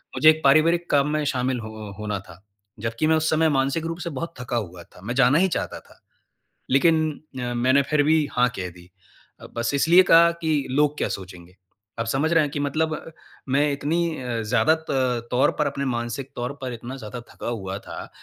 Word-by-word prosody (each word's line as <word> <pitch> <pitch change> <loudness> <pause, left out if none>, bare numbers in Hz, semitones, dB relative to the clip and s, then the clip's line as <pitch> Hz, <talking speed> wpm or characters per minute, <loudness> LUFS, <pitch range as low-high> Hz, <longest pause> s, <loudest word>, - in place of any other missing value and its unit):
मुझे 155 - +6
एक 155 0 +3
पारिवारिक 165 +5 +4
काम 145 0 +3
में 155 0 0
शामिल 130 -1 -1
ह 110 -2 -8
होना 105 -1 -3
था। 85 +2 -14 0.4
जबकि 115 +7 -1
मैं 160 - +4
उस 160 0 +1
समय 160 0 +3
मानसिक 140 +3 0
रूप 165 0 -3
से 175 - -4
बहुत 165 +3 -5
थका 125 -1 -2
हुआ 90 -6 -5
था 90 - -19
मैं 120 +5 -4
जाना 135 +2 +5
ही 190 - +4
चाहता 180 - -3
था। - - -22 0.7
लेकिन 160 +4 +4 0.4
अ, 120 -1 -3
मैंने 130 +3 +3
फिर 150 -1 +4
भी 155 +1 +3
हाँ, 125 0 +3
कह 90 -1 -4
दी 90 0 -16 0.7
बस 115 +3 -1
इसलिए 170 +6 +6
कहा 170 +1 +7
कि 155 -4 0
लोग 150 +2 +2
क्या - - -1
सोचेंगे। 90 -1 -13 0.4
आप 115 - -1
समझ 140 +7 0
रहे 165 - +5
हैं 145 - -2
कि 145 - -3
मतलब 155 +2 0 0.5
मैं 145 +2 +2
इतनी 160 +3 -1
अ, 120 -2 -3
ज़्यादा 125 +8 +3
त 125 -3 0
तौर 125 +1 +3
पर - - +2
अपने 140 0 -3
मानसिक 120 +1 -3
तौर 125 +3 -3
पर 130 -2 -4
इतना 120 +3 -7
ज़्यादा 120 0 -7
थका - - -7
हुआ 95 -5 -4
था, - - -9
135 Hz, 205 wpm, -24 LUFS, 120-155 Hz, 0.7 s, कहा